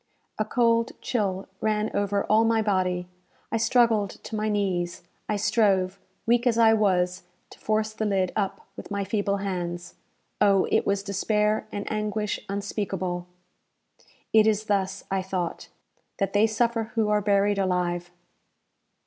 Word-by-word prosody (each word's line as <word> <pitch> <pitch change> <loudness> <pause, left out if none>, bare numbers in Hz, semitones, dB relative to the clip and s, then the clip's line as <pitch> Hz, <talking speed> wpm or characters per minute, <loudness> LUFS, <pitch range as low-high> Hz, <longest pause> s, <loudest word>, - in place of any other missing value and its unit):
A 215 - +1
cold 230 0 +2
chill 195 -5 -2
ran 215 0 0
over 200 0 +1
all 220 +1 +4
my 225 -1 +2
body 180 -3 0 0.4
I 225 - +1
struggled 230 -3 +3
to 220 - -6
my 215 0 -1
knees 180 -5 -1 0.3
I 210 - +1
strove, 195 -3 +2 0.3
weak 240 +2 +3
as 230 -2 +2
I 225 -1 +6
was, 180 -4 +1 0.3
to - - -14
force 215 0 0
the 220 0 -2
lid 190 -3 +1
up 200 -2 -1
with - - -9
my 200 -1 -2
feeble 200 0 0
hands. 175 -2 -4 0.5
Oh, 200 -2 +4
it - - +2
was 200 0 +1
despair 210 +2 0
and 205 - -4
anguish 210 -1 -2
unspeakable! 195 -3 -3 1.1
"It 220 0 +6
is 215 -1 +2
thus," 195 -2 -1
I 195 0 +1
thought, 185 -2 -4 0.5
"that 195 -1 -1
they 210 +2 +4
suffer 230 +1 0
who 220 -2 +2
are 210 0 +2
buried 200 0 +2
alive!" 175 -2 0
205 Hz, 150 wpm, -26 LUFS, 190-215 Hz, 1.1 s, I